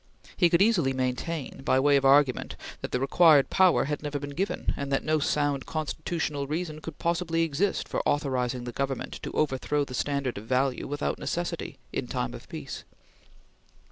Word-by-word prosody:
He 175 Hz, -, +4 dB
could 170 Hz, +3 st, +5 dB
easily 175 Hz, -12 st, +3 dB
maintain, 130 Hz, +3 st, -3 dB
by 130 Hz, -1 st, +2 dB
way 145 Hz, +1 st, +4 dB
of 140 Hz, -1 st, +2 dB
argument, 135 Hz, -1 st, +4 dB, 0.3 s
that -, -, -5 dB
the 125 Hz, -, 0 dB
required 145 Hz, +1 st, +5 dB
power 185 Hz, -2 st, +5 dB
had 150 Hz, +1 st, -3 dB
never 145 Hz, -1 st, -3 dB
been 145 Hz, 0 st, -6 dB
given, 185 Hz, +8 st, -1 dB
and 140 Hz, 0 st, -4 dB
that 135 Hz, -, +1 dB
no 155 Hz, 0 st, +2 dB
sound 145 Hz, -1 st, 0 dB
constitutional 155 Hz, -2 st, -2 dB
reason 155 Hz, 0 st, -3 dB
could 160 Hz, -1 st, -8 dB
possibly 170 Hz, -1 st, 0 dB
exist 165 Hz, +5 st, 0 dB
for -, -, -1 dB
authorizing 130 Hz, -4 st, 0 dB
the 120 Hz, -, -5 dB
Government 135 Hz, +1 st, -3 dB
to -, -, -5 dB
overthrow 145 Hz, 0 st, 0 dB
the 130 Hz, -, -9 dB
standard 140 Hz, -3 st, -1 dB
of 110 Hz, -, -12 dB
value 130 Hz, +1 st, +1 dB
without 145 Hz, +1 st, -2 dB
necessity, 175 Hz, 0 st, -3 dB, 0.2 s
in -, -, -2 dB
time -, -, -2 dB
of -, -, -11 dB
peace. -, -, -7 dB
145 Hz, 175 wpm, -27 LUFS, 135-160 Hz, 0.3 s, could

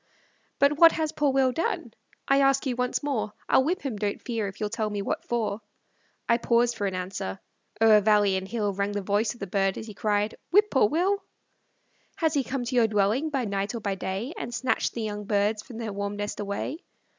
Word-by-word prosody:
But 285 Hz, +1 st, +3 dB
what 335 Hz, -1 st, +8 dB
has 315 Hz, -2 st, -1 dB
poor 295 Hz, -3 st, +1 dB
Will 265 Hz, -1 st, +3 dB
done? 325 Hz, +6 st, -2 dB, 0.3 s
I 275 Hz, 0 st, +4 dB
ask 275 Hz, +1 st, +3 dB
you 255 Hz, -2 st, -1 dB
once 250 Hz, +3 st, -1 dB
more; 250 Hz, -7 st, -2 dB
I'll 260 Hz, -, +4 dB
whip 345 Hz, +7 st, -1 dB
him, 260 Hz, -7 st, -3 dB
don't 205 Hz, -1 st, -2 dB
fear, 225 Hz, -4 st, -3 dB
if 195 Hz, -, -9 dB
you'll 210 Hz, -1 st, -2 dB
tell 220 Hz, -1 st, -1 dB
me 205 Hz, -1 st, -3 dB
what -, -, -2 dB
for. 225 Hz, -3 st, -1 dB, 0.7 s
I 235 Hz, 0 st, +3 dB
paused 235 Hz, 0 st, +2 dB
for 205 Hz, -, -1 dB
an 190 Hz, -, -3 dB
answer; 180 Hz, -, -4 dB, 0.4 s
o'er 220 Hz, -1 st, +6 dB
valley 205 Hz, -2 st, +4 dB
and 190 Hz, 0 st, -3 dB
hill 210 Hz, -2 st, -1 dB
Rang 200 Hz, +1 st, -1 dB
the 205 Hz, -1 st, -2 dB
voice 210 Hz, +4 st, 0 dB
of -, -, -17 dB
the 200 Hz, -, -3 dB
bird, 195 Hz, 0 st, 0 dB
as -, -, -6 dB
he 215 Hz, -, -9 dB
cried, 210 Hz, 0 st, 0 dB, 0.2 s
"Whip 415 Hz, +3 st, +4 dB
poor 260 Hz, -7 st, +4 dB
Will." 385 Hz, +6 st, +1 dB, 0.9 s
Has 320 Hz, -5 st, +1 dB
he 280 Hz, -3 st, +2 dB
come 260 Hz, 0 st, -3 dB
to 255 Hz, -, -3 dB
your 235 Hz, -2 st, +5 dB
dwelling, 215 Hz, +8 st, +1 dB
by 270 Hz, -5 st, -1 dB
night 200 Hz, +2 st, -2 dB
or -, -, -3 dB
by 200 Hz, -2 st, -2 dB
day, 195 Hz, -, -4 dB
And 240 Hz, -, -5 dB
snatched 260 Hz, +2 st, 0 dB
the 230 Hz, -, -3 dB
young 210 Hz, -1 st, -4 dB
birds 210 Hz, +1 st, +1 dB
from 235 Hz, 0 st, -11 dB
their 225 Hz, -3 st, -4 dB
warm 200 Hz, +1 st, -3 dB
nest 205 Hz, 0 st, -4 dB
away? 205 Hz, +9 st, -3 dB
220 Hz, 225 wpm, -26 LUFS, 205-265 Hz, 0.9 s, what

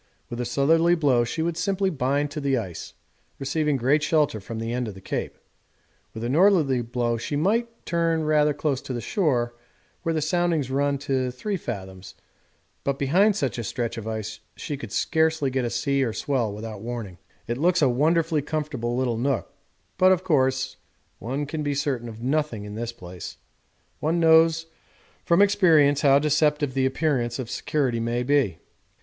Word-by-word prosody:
With 120 Hz, +1 st, -3 dB
a -, -, -2 dB
southerly 165 Hz, +7 st, +3 dB
blow 135 Hz, -7 st, +3 dB
she 160 Hz, +7 st, -2 dB
would 170 Hz, 0 st, -2 dB
simply 190 Hz, +2 st, 0 dB
bind 140 Hz, -1 st, 0 dB
on -, -, -5 dB
to 145 Hz, +1 st, -5 dB
the 135 Hz, -2 st, +1 dB
ice, 95 Hz, -8 st, -6 dB, 0.4 s
receiving 150 Hz, +1 st, 0 dB
great 135 Hz, +5 st, +2 dB
shelter 150 Hz, -5 st, +1 dB
from 110 Hz, +3 st, -7 dB
the 115 Hz, +1 st, -3 dB
end 125 Hz, -1 st, -2 dB
of 105 Hz, -, -7 dB
the -, -, -10 dB
Cape. -, -, -4 dB, 0.8 s
With 110 Hz, -, -5 dB
a -, -, -1 dB
northerly 155 Hz, -3 st, +3 dB
blow 120 Hz, 0 st, -1 dB
she 130 Hz, +6 st, -4 dB
might 210 Hz, +10 st, +1 dB, 0.2 s
turn 165 Hz, -1 st, +1 dB
rather 150 Hz, -1 st, +3 dB
close 145 Hz, -2 st, -1 dB
to 140 Hz, -3 st, -6 dB
the 120 Hz, -, -3 dB
shore, 120 Hz, -, 0 dB, 0.5 s
where 165 Hz, -2 st, -1 dB
the -, -, +1 dB
soundings 160 Hz, -3 st, 0 dB
run 140 Hz, +1 st, +1 dB
to 130 Hz, -2 st, 0 dB
3 195 Hz, +12 st, -3 dB
fathoms, 95 Hz, -, -7 dB, 0.7 s
but 140 Hz, -1 st, -1 dB
behind 185 Hz, +10 st, +3 dB
such 135 Hz, -9 st, -2 dB
a -, -, -3 dB
stretch 115 Hz, +2 st, -3 dB
of 115 Hz, -2 st, -6 dB
ice 110 Hz, -1 st, -4 dB, 0.2 s
she 145 Hz, -, -5 dB
could 115 Hz, -6 st, -8 dB
scarcely 160 Hz, +3 st, +1 dB
get 130 Hz, -1 st, 0 dB
a -, -, -1 dB
sea 140 Hz, +3 st, 0 dB
or 115 Hz, -4 st, -1 dB
swell 125 Hz, -6 st, -1 dB
without 105 Hz, 0 st, -7 dB
warning. 110 Hz, -6 st, -6 dB, 0.3 s
It 120 Hz, +2 st, -3 dB
looks 175 Hz, +1 st, +3 dB
a -, -, +6 dB
wonderfully 155 Hz, +4 st, +2 dB
comfortable 140 Hz, -5 st, -3 dB
little 125 Hz, -3 st, 0 dB
nook, 130 Hz, -2 st, -1 dB, 0.5 s
but, 185 Hz, 0 st, +6 dB
of 185 Hz, -1 st, +2 dB
course, 130 Hz, -5 st, +1 dB, 0.4 s
one 135 Hz, +5 st, -3 dB
can 150 Hz, +2 st, -4 dB
be 145 Hz, -1 st, -1 dB
certain 135 Hz, -5 st, -2 dB
of 110 Hz, -1 st, -10 dB
nothing 135 Hz, -6 st, -1 dB
in 105 Hz, -, -7 dB
this 115 Hz, +2 st, -4 dB
place; 90 Hz, -5 st, -9 dB, 0.6 s
one 165 Hz, +3 st, 0 dB
knows 165 Hz, 0 st, +5 dB, 0.6 s
from 170 Hz, +4 st, +5 dB
experience 160 Hz, -8 st, +4 dB
how 140 Hz, -2 st, +6 dB
deceptive 150 Hz, -1 st, +2 dB
the 130 Hz, 0 st, +2 dB
appearance 130 Hz, -4 st, 0 dB
of 125 Hz, -3 st, -5 dB
security 130 Hz, -6 st, -1 dB
may 120 Hz, +2 st, -1 dB
be. 130 Hz, -, +2 dB
140 Hz, 180 wpm, -25 LUFS, 120-155 Hz, 0.8 s, a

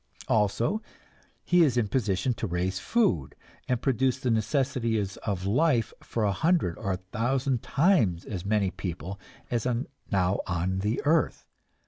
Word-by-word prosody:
Also 115 Hz, -, +1 dB, 0.6 s
he 175 Hz, 0 st, +4 dB
is 135 Hz, -7 st, +3 dB
in 115 Hz, -3 st, +2 dB
position 105 Hz, +1 st, 0 dB
to 115 Hz, -, -3 dB
raise 90 Hz, +2 st, -1 dB
food 95 Hz, -, +1 dB, 0.3 s
and 125 Hz, -1 st, 0 dB
produce 130 Hz, -1 st, +2 dB
the 130 Hz, -2 st, -1 dB
necessities 115 Hz, -4 st, 0 dB
of 95 Hz, -3 st, -3 dB
life 120 Hz, +2 st, +2 dB
for 115 Hz, -, -2 dB
a 105 Hz, -, +3 dB
hundred 150 Hz, -, +1 dB
or 95 Hz, -1 st, -1 dB
thousand 120 Hz, +7 st, -1 dB
times 135 Hz, -, +2 dB
as 95 Hz, -4 st, -5 dB
many 100 Hz, -2 st, +1 dB
people 90 Hz, +2 st, -5 dB, 0.3 s
as 120 Hz, 0 st, 0 dB
are 125 Hz, +1 st, 0 dB, 0.3 s
now 95 Hz, -1 st, +2 dB
on 95 Hz, +1 st, -1 dB
the 105 Hz, +6 st, -1 dB
earth. 160 Hz, +2 st, +2 dB
110 Hz, 145 wpm, -27 LUFS, 95-130 Hz, 0.6 s, he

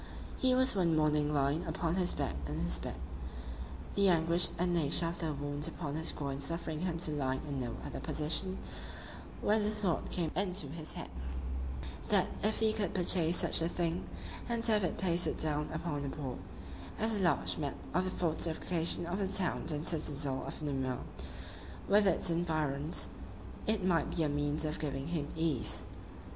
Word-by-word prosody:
He 255 Hz, -1 st, +3 dB
was 260 Hz, -3 st, +3 dB
one 170 Hz, -4 st, +2 dB
morning 150 Hz, -1 st, +2 dB
lying 145 Hz, +1 st, +1 dB
upon 165 Hz, +1 st, -1 dB
his 180 Hz, -1 st, +3 dB
back -, -, -2 dB
in 75 Hz, +1 st, -4 dB
his 85 Hz, -8 st, 0 dB
bed, -, -, -5 dB, 1.0 s
the 200 Hz, -1 st, +4 dB
anguish 170 Hz, 0 st, +4 dB
and 175 Hz, 0 st, +1 dB
nature 165 Hz, 0 st, +4 dB
of 170 Hz, -, -6 dB
the 160 Hz, -2 st, -1 dB
wound 145 Hz, 0 st, -2 dB
upon 150 Hz, -5 st, -5 dB
his 160 Hz, +2 st, +4 dB
groin 140 Hz, -2 st, -4 dB
suffering 160 Hz, +1 st, 0 dB
him 175 Hz, -1 st, -2 dB
to 165 Hz, -2 st, 0 dB
lie 135 Hz, -3 st, -1 dB
in 140 Hz, -2 st, -3 dB
no 120 Hz, -3 st, -3 dB
other -, -, -5 dB
position, 155 Hz, +7 st, +2 dB, 0.8 s
when 215 Hz, +1 st, +2 dB
a 210 Hz, -, +2 dB
thought 210 Hz, -5 st, -1 dB
came 165 Hz, -3 st, -1 dB
into 185 Hz, -4 st, 0 dB
his 155 Hz, +1 st, -5 dB
head, -, -, -7 dB, 1.0 s
that -, -, +3 dB
if 215 Hz, +1 st, +1 dB
he 220 Hz, -1 st, +3 dB
could 205 Hz, -5 st, -2 dB
purchase 175 Hz, -2 st, +4 dB
such -, -, +5 dB
a 165 Hz, -, +1 dB
thing, 175 Hz, 0 st, -2 dB, 0.4 s
and 235 Hz, -1 st, 0 dB
have 215 Hz, -3 st, +4 dB
it 175 Hz, -, -1 dB
pasted 175 Hz, -2 st, +2 dB
down 150 Hz, -1 st, 0 dB
upon 155 Hz, -3 st, -3 dB
a -, -, -3 dB
board, 135 Hz, -4 st, -5 dB, 0.6 s
as 220 Hz, +1 st, +1 dB
a 210 Hz, -, 0 dB
large 170 Hz, -3 st, +2 dB
map 145 Hz, -2 st, -2 dB, 0.2 s
of 180 Hz, +1 st, +1 dB
the -, -, -1 dB
fortification 170 Hz, 0 st, +1 dB
of 175 Hz, +3 st, -3 dB
the 195 Hz, -, 0 dB
town 185 Hz, -4 st, +3 dB
and 150 Hz, +1 st, -2 dB
citadel 145 Hz, -4 st, +2 dB
of -, -, -6 dB
Namur, 135 Hz, -3 st, -1 dB, 0.9 s
with 205 Hz, 0 st, +5 dB
its 175 Hz, -1 st, +2 dB
environs, 155 Hz, -3 st, 0 dB, 0.6 s
it 215 Hz, -3 st, +1 dB
might 170 Hz, -3 st, +1 dB
be 165 Hz, -, +2 dB
a 150 Hz, -, +1 dB
means 145 Hz, +1 st, -1 dB
of 155 Hz, 0 st, -3 dB
giving 140 Hz, -1 st, -3 dB
him 155 Hz, -4 st, -2 dB
ease. 160 Hz, -1 st, 0 dB
165 Hz, 180 wpm, -33 LUFS, 145-180 Hz, 1.0 s, such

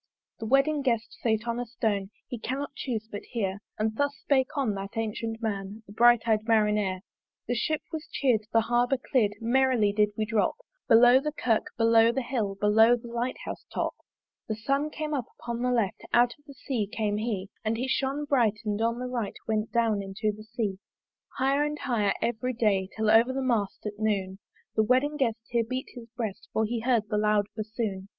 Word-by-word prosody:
The 225 Hz, -, -4 dB
wedding 275 Hz, +4 st, +3 dB
guest 235 Hz, -4 st, -1 dB
sate 220 Hz, 0 st, 0 dB
on 235 Hz, 0 st, -1 dB
a 245 Hz, -, -2 dB
stone, 210 Hz, -4 st, -1 dB, 0.2 s
He 245 Hz, -, -6 dB
cannot 270 Hz, +5 st, -4 dB
chuse 225 Hz, -5 st, -4 dB
but 205 Hz, -, -5 dB
hear: 200 Hz, -5 st, -3 dB, 0.2 s
And 220 Hz, 0 st, -1 dB
thus 285 Hz, 0 st, +1 dB
spake 265 Hz, -2 st, +2 dB
on 260 Hz, -7 st, +1 dB
that 195 Hz, 0 st, -6 dB
ancyent 225 Hz, 0 st, -3 dB
man, 205 Hz, 0 st, -3 dB
The 205 Hz, -, -13 dB
bright 240 Hz, +1 st, +5 dB
eyed 215 Hz, -1 st, +2 dB
Marinere. 210 Hz, -4 st, +2 dB, 0.5 s
The 245 Hz, -, 0 dB
Ship 305 Hz, +6 st, -1 dB
was 320 Hz, 0 st, -5 dB
cheer'd, 230 Hz, -6 st, +1 dB
the 225 Hz, -, +4 dB
Harbour 245 Hz, +3 st, +2 dB
clear'd 235 Hz, -5 st, +1 dB
Merrily 240 Hz, -3 st, +2 dB
did 210 Hz, 0 st, +3 dB
we 215 Hz, -, 0 dB
drop 215 Hz, -2 st, +1 dB, 0.3 s
Below 245 Hz, +2 st, +7 dB
the 300 Hz, +2 st, -2 dB
Kirk, 235 Hz, -7 st, 0 dB
below 230 Hz, 0 st, +5 dB
the 265 Hz, +2 st, -2 dB
Hill, 225 Hz, -6 st, -2 dB
Below 220 Hz, +4 st, +5 dB
the 235 Hz, 0 st, -9 dB
Light 235 Hz, +2 st, -2 dB
house -, -, -6 dB
top. -, -, -1 dB, 0.5 s
The 220 Hz, -, -2 dB
Sun 275 Hz, +7 st, 0 dB
came 305 Hz, 0 st, -4 dB
up 265 Hz, -5 st, -1 dB
upon 235 Hz, 0 st, -4 dB
the 250 Hz, -, +1 dB
left, 230 Hz, -6 st, 0 dB
Out 240 Hz, 0 st, +5 dB
of 290 Hz, -, -31 dB
the 280 Hz, -, -11 dB
Sea 245 Hz, -6 st, -2 dB
came 210 Hz, -2 st, -1 dB
he: 210 Hz, -3 st, -2 dB
And 220 Hz, 0 st, 0 dB
he 255 Hz, +3 st, -2 dB
shone 270 Hz, +3 st, -1 dB
bright, 235 Hz, -7 st, +2 dB
and 210 Hz, 0 st, -1 dB
on 230 Hz, +1 st, +1 dB
the 250 Hz, -, -4 dB
right 245 Hz, -4 st, -3 dB
Went 215 Hz, 0 st, -1 dB
down 225 Hz, -4 st, +2 dB
into 200 Hz, +2 st, -2 dB
the 215 Hz, 0 st, -12 dB
Sea. 200 Hz, -5 st, -1 dB, 0.6 s
Higher 275 Hz, +2 st, +2 dB
and 295 Hz, 0 st, -2 dB
higher 225 Hz, -8 st, +1 dB
every 240 Hz, +2 st, -1 dB
day, 200 Hz, -5 st, +1 dB
Till 220 Hz, -1 st, +2 dB
over 230 Hz, +3 st, +5 dB
the 265 Hz, +1 st, -2 dB
mast 225 Hz, -7 st, -1 dB
at 210 Hz, 0 st, -5 dB
noon 195 Hz, -3 st, -1 dB, 0.4 s
The 220 Hz, -, +4 dB
wedding 260 Hz, +7 st, +2 dB
guest 235 Hz, -6 st, 0 dB
here 235 Hz, -1 st, +2 dB
beat 255 Hz, +3 st, -4 dB
his 240 Hz, -2 st, -10 dB
breast, 220 Hz, -2 st, -4 dB
For 220 Hz, -, +2 dB
he 235 Hz, +2 st, -2 dB
heard 230 Hz, -2 st, +1 dB
the 210 Hz, -, +1 dB
loud 210 Hz, -1 st, +3 dB
bassoon. 215 Hz, -3 st, -4 dB
230 Hz, 200 wpm, -28 LUFS, 215-250 Hz, 0.6 s, Below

